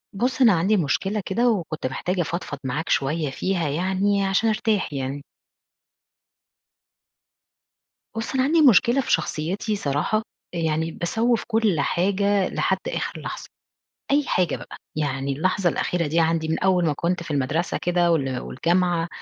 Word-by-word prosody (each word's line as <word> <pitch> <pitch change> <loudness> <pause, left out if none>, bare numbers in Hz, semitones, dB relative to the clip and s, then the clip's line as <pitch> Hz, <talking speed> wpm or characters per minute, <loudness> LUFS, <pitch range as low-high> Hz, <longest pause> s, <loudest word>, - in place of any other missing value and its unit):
ُبص، 255 +5 -1
أنا 230 -6 +7
عندي 190 +6 +2
مشكلة 195 +7 0
كده 240 +5 +2
وكنت 165 - -2
محتاجة 180 +8 -2
أفضفض 165 -3 -4
معاك 135 +5 -3
شوية 150 +2 0
فيها 175 +1 -1
يعني 190 +5 +1
عشان 195 +4 +2
أرتاح 215 -6 0
يعني. 135 +1 -4 2.9
بُص، 225 +3 -3
أنا 260 -1 +2
عندي 315 +4 +3
مشكلة 255 0 +5
في - - -4
شخصيتي 170 +6 -1
صراحة. 150 +3 0 0.4
أ - - -2
يعني 160 0 0
باسوّف 225 +8 0
كل 220 -7 +1
حاجة 195 +5 +1
لحد - - 0
آخر - - -3
لحظة. - - -6 0.7
أي 285 +1 +3
حاجة 180 -1 +1
بقى. - - -10 0.2
يعني 140 -2 -1
اللحظة 180 +5 +1
الأخيرة 170 +1 -1
دي 160 +3 +1
عندي 165 -1 +1
من 160 - 0
أول 185 -2 +2
ما 155 - +2
كنت 170 +4 -1
في 170 - -10
المدرسة 145 +4 -1
كده 175 -1 +2
وال 135 -5 0
والجامعة 175 +2 0
175 Hz, 145 wpm, -23 LUFS, 155-205 Hz, 2.9 s, أنا